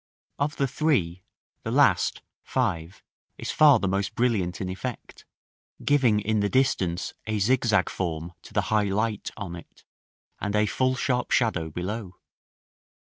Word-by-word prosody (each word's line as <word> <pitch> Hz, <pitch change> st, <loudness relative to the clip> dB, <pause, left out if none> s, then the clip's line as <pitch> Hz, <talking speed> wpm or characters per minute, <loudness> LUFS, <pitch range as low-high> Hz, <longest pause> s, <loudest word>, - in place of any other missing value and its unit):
Of 145 Hz, +1 st, 0 dB
the 140 Hz, -, +1 dB
three, 120 Hz, -, 0 dB, 0.4 s
the -, -, -5 dB
last, -, -, +3 dB, 0.2 s
5, 85 Hz, +3 st, -2 dB, 0.3 s
is -, -, -4 dB
far 150 Hz, -3 st, +7 dB
the 100 Hz, -, -1 dB
most 95 Hz, +1 st, -1 dB
brilliant 105 Hz, -8 st, 0 dB
in 95 Hz, -, -3 dB
effect, 95 Hz, +6 st, -6 dB, 0.6 s
giving 130 Hz, -7 st, +4 dB
in 110 Hz, +1 st, 0 dB
the 100 Hz, 0 st, +1 dB
distance 95 Hz, -10 st, +1 dB
a 110 Hz, -1 st, 0 dB
zigzag 115 Hz, +1 st, +2 dB
form 85 Hz, -1 st, -4 dB
to -, -, -14 dB
the -, -, +1 dB
high 105 Hz, -1 st, +3 dB
light 105 Hz, +2 st, -1 dB
on 95 Hz, -5 st, -5 dB
it, 85 Hz, -, -14 dB, 0.6 s
and 100 Hz, 0 st, -2 dB
a 105 Hz, 0 st, +4 dB
full 130 Hz, +5 st, +1 dB
sharp 125 Hz, -2 st, 0 dB
shadow 90 Hz, -10 st, +1 dB
below. 95 Hz, +3 st, -5 dB
105 Hz, 145 wpm, -26 LUFS, 90-125 Hz, 0.6 s, far